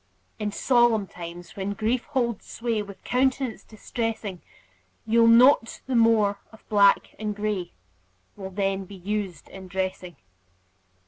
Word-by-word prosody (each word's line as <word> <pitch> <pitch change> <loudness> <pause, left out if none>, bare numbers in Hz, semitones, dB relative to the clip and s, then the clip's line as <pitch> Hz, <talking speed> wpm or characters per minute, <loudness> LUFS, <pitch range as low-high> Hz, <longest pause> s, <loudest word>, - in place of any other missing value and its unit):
In 210 -1 -2
solemn 240 -2 +3
times, 175 -1 -10
when 195 +1 -3
grief 225 +4 -1
holds 240 -6 -2
sway 230 -2 -2
With 200 -1 -10
countenance 260 -1 0
distressing, 220 -4 -4 0.6
You'll 230 +1 +4
note 235 +1 +5
the 265 - -3
more 220 -3 +3
of 220 - -18
black 200 -2 +4
and 210 -1 -3
gray 205 -4 -3 0.6
Will 190 -2 -7
then 195 0 -1
be 200 - -11
used 195 -1 -4
in 190 -1 -10
dressing. 185 -1 -4
210 Hz, 130 wpm, -25 LUFS, 195-230 Hz, 0.6 s, note